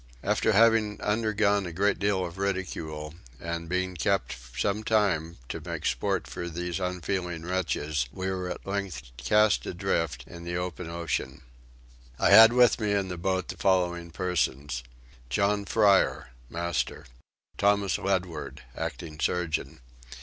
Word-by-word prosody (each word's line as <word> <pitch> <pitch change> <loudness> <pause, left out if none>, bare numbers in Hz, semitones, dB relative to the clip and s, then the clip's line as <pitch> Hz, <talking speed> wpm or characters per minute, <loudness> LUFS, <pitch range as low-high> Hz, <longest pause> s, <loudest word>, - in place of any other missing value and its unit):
After 105 +2 +2
having 110 -1 +4
undergone 105 -2 +1
a - - -5
great 100 +5 +1
deal 100 -2 +1
of 90 +2 -8
ridicule 80 -6 -3 0.3
and 85 0 -4
been 90 0 -1
kept 95 +4 0 0.2
some 105 - 0
time 90 -8 +1
to - - -4
make - - -5
sport - - 0
for 85 0 -5
these 85 +2 -3
unfeeling 90 -2 -3
wretches 75 -6 -1
we 95 +5 -4
were 90 -1 -3
at - - -6
length 100 -9 -4
cast 100 - +3
adrift 75 -7 -1
in 85 -1 -10
the 85 0 -3
open 90 -1 -4
ocean. 80 -6 -3 0.7
I - - +3
had 110 +1 +10
with 120 -1 +4
me 105 -1 +1
in 100 -2 0
the 90 - -3
boat 95 +1 -1
the - - -5
following 90 -3 +1
persons: 75 -7 -1 0.5
John 100 +8 +1
Fryer: 100 -2 +3 0.2
Master. 85 0 -2 0.5
Thomas 100 -1 +3
Ledward: 90 -5 -2
Acting 75 -2 -5
Surgeon. 85 -6 -1
90 Hz, 140 wpm, -28 LUFS, 85-100 Hz, 0.7 s, had